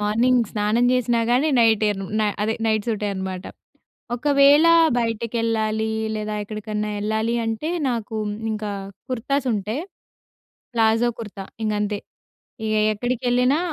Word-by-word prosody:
Morning 235 Hz, +4 st, +3 dB
స్నానం 215 Hz, +3 st, +1 dB
చేసినా 245 Hz, -2 st, +2 dB
గానీ, 260 Hz, +6 st, +3 dB
నైటేను 215 Hz, -3 st, +3 dB
న -, -, +2 dB, 0.2 s
అదే 220 Hz, +1 st, 0 dB
నైట్ 215 Hz, -2 st, +1 dB
సూటే 210 Hz, -2 st, -1 dB
అనమాట. 190 Hz, -1 st, -5 dB, 0.7 s
ఒకవేళా 285 Hz, +5 st, +5 dB, 0.3 s
బయటకెళ్ళాలీ, 225 Hz, -1 st, -1 dB, 0.2 s
లేదా 215 Hz, 0 st, -3 dB
ఎక్కడికన్నా 215 Hz, 0 st, -4 dB
యెళ్ళాలి 220 Hz, +3 st, -1 dB
అంటే, 225 Hz, +7 st, -2 dB, 0.2 s
నాకు 230 Hz, -2 st, -3 dB, 0.4 s
ఇంకా 210 Hz, -1 st, -3 dB, 0.4 s
కుర్తాసుంటే, 245 Hz, -4 st, -1 dB, 1.0 s
ప్లాజో 225 Hz, +1 st, +3 dB
కుర్తా 205 Hz, -3 st, -7 dB, 0.2 s
ఇంగంతే. 210 Hz, -1 st, -1 dB, 0.7 s
ఇగ 215 Hz, 0 st, 0 dB, 0.2 s
ఎక్కడికెళ్ళినా 250 Hz, +5 st, +1 dB
220 Hz, 105 wpm, -22 LUFS, 210-245 Hz, 1.0 s, ఒకవేళా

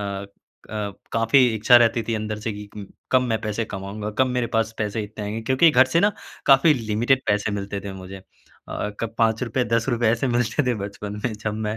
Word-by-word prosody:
अ, 100 Hz, -1 st, -4 dB, 0.9 s
काफ़ी 115 Hz, +3 st, +4 dB
इच्छा 110 Hz, +3 st, +6 dB
रहती 115 Hz, -1 st, +3 dB
थी 115 Hz, -, +1 dB
अंदर 110 Hz, 0 st, -3 dB
से 110 Hz, -, 0 dB
कि 105 Hz, 0 st, -9 dB, 0.4 s
कब 130 Hz, -, +6 dB
मैं 115 Hz, -3 st, -1 dB
पैसे 110 Hz, +1 st, -2 dB
कमाऊँगा? 105 Hz, +1 st, -6 dB
कब 130 Hz, -, +4 dB
मेरे 125 Hz, -1 st, -1 dB
पास 110 Hz, 0 st, 0 dB
पैसे 105 Hz, 0 st, -2 dB
इतने 105 Hz, 0 st, -7 dB
आएँगे? 105 Hz, +2 st, -4 dB
क्योंकि 130 Hz, +7 st, +4 dB
घर 130 Hz, -2 st, +6 dB
से 170 Hz, -, +5 dB
ना 205 Hz, +2 st, +3 dB, 0.3 s
काफ़ी 140 Hz, +3 st, +6 dB
लिमिटेड 120 Hz, +3 st, +1 dB
पैसे 105 Hz, 0 st, +1 dB
मिलते 100 Hz, 0 st, -5 dB
थे 100 Hz, 0 st, -7 dB
मुझे। 95 Hz, 0 st, -9 dB
अ, 95 Hz, +2 st, -8 dB
कब 115 Hz, -1 st, -4 dB
₹5- 115 Hz, +2 st, +1 dB
₹10 115 Hz, -1 st, +1 dB
ऐसे 120 Hz, +3 st, 0 dB
मिलते 120 Hz, +4 st, +1 dB
थे 125 Hz, -, +2 dB
बचपन 105 Hz, 0 st, -7 dB
में 125 Hz, -, 0 dB
जब 105 Hz, 0 st, -4 dB
मैं 105 Hz, -, -3 dB
110 Hz, 200 wpm, -23 LUFS, 105-125 Hz, 0.9 s, इच्छा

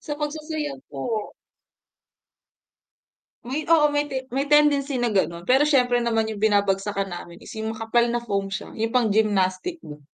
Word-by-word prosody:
Sa 295 Hz, -, -5 dB
pagsasayaw 300 Hz, -1 st, -4 dB
po. 205 Hz, -, -4 dB, 2.1 s
May 285 Hz, +4 st, -1 dB
oo 300 Hz, -2 st, +5 dB
may 290 Hz, 0 st, +2 dB, 0.3 s
may 275 Hz, +1 st, 0 dB
tendency 290 Hz, -2 st, +3 dB
na 240 Hz, -1 st, +1 dB
ganon, 170 Hz, -2 st, 0 dB
pero 265 Hz, +3 st, +6 dB
siyempre 250 Hz, -5 st, +3 dB
naman 225 Hz, -1 st, +1 dB
'yung 215 Hz, -1 st, -6 dB
binabagsakan 200 Hz, -1 st, +1 dB
namin 175 Hz, -1 st, -9 dB
is -, -, -10 dB
'yung 220 Hz, 0 st, -3 dB
makapal 225 Hz, +2 st, +1 dB
na 240 Hz, -, 0 dB
foam 200 Hz, -4 st, -2 dB
siya, 195 Hz, -, -4 dB
'yung 225 Hz, +1 st, -1 dB
pang 245 Hz, -3 st, +3 dB
gymnastic 205 Hz, -, +1 dB
dun. 150 Hz, -, -11 dB
225 Hz, 155 wpm, -24 LUFS, 200-280 Hz, 2.1 s, pero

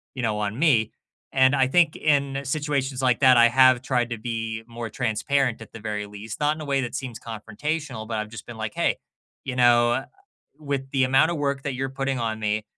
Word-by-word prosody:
you 130 Hz, -, -4 dB
know, 110 Hz, -2 st, 0 dB
on 105 Hz, +4 st, -3 dB
me. 120 Hz, -9 st, +3 dB, 0.4 s
And 130 Hz, +1 st, +4 dB
I 130 Hz, -1 st, +3 dB
think 165 Hz, +1 st, +3 dB
in 140 Hz, -2 st, +1 dB
situations 140 Hz, -2 st, -2 dB
like 125 Hz, -3 st, +3 dB
that, 130 Hz, -3 st, +6 dB
I 120 Hz, 0 st, +7 dB
have 130 Hz, 0 st, +5 dB
tried 125 Hz, -2 st, 0 dB
to 115 Hz, -, -4 dB
be 110 Hz, -1 st, -4 dB
more 115 Hz, -1 st, -6 dB
transparent, 120 Hz, +2 st, 0 dB
at -, -, -11 dB
the 115 Hz, -, -10 dB
very 105 Hz, -1 st, -4 dB
least, 105 Hz, +1 st, -8 dB
not 150 Hz, +1 st, +2 dB
in -, -, -8 dB
a -, -, -6 dB
way 140 Hz, -1 st, +1 dB
that 120 Hz, 0 st, -4 dB
seems 130 Hz, -4 st, -5 dB
confrontational, 120 Hz, +2 st, -5 dB
but 110 Hz, -1 st, -3 dB
I've 110 Hz, 0 st, -4 dB
just 115 Hz, -2 st, -10 dB
been 120 Hz, -2 st, -9 dB
like, 110 Hz, -1 st, -4 dB
"Hey, -, -, 0 dB, 0.5 s
you 130 Hz, -2 st, -4 dB
know, 120 Hz, +1 st, +4 dB, 0.5 s
with 140 Hz, -3 st, -4 dB
the 135 Hz, -1 st, +1 dB
amount 135 Hz, +5 st, +4 dB
of 170 Hz, -, -2 dB
work 140 Hz, -1 st, -1 dB
that 140 Hz, -3 st, -3 dB
you're 135 Hz, +1 st, -2 dB
putting 135 Hz, -1 st, -2 dB
on 110 Hz, -1 st, -2 dB
me, 105 Hz, 0 st, -1 dB
125 Hz, 220 wpm, -24 LUFS, 110-135 Hz, 0.5 s, I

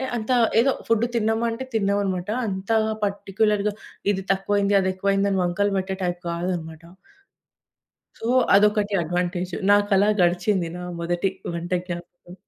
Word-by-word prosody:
అంత 230 Hz, +2 st, -3 dB, 0.3 s
ఏదో 265 Hz, +4 st, +4 dB, 0.2 s
ఫుడ్ 230 Hz, 0 st, +2 dB
తిన్నామా 225 Hz, 0 st, +1 dB
అంటే 230 Hz, +3 st, -5 dB
తిన్నాం 200 Hz, -2 st, +1 dB
అన్నమాట. 185 Hz, -1 st, -3 dB, 0.2 s
అంత 190 Hz, 0 st, -5 dB, 0.4 s
పర్టిక్యులర్‌గా 205 Hz, +1 st, 0 dB, 0.4 s
ఇది 195 Hz, -, -2 dB
తక్కువయింది, 200 Hz, +1 st, 0 dB
అదెక్కువయింది 195 Hz, +1 st, 0 dB
అని 190 Hz, -, +1 dB
వంకలు 200 Hz, +3 st, 0 dB
పెట్టే 190 Hz, 0 st, -2 dB
టైప్ 175 Hz, 0 st, -2 dB
గాదన్నమాట. 170 Hz, -2 st, -4 dB, 1.4 s
సో 225 Hz, -, -4 dB, 0.3 s
అదొకటి 210 Hz, 0 st, +3 dB
అడ్వాంటేజ్. 175 Hz, +2 st, -2 dB, 0.2 s
నాకలా 205 Hz, 0 st, +4 dB
గడిచింది, 180 Hz, +1 st, +1 dB
నా 180 Hz, -, -7 dB, 0.2 s
మొదటి 175 Hz, +3 st, 0 dB, 0.2 s
వంట 170 Hz, +1 st, -5 dB, 0.2 s
జ్ఞాపకం. 175 Hz, 0 st, -8 dB
195 Hz, 125 wpm, -23 LUFS, 175-205 Hz, 1.4 s, ఏదో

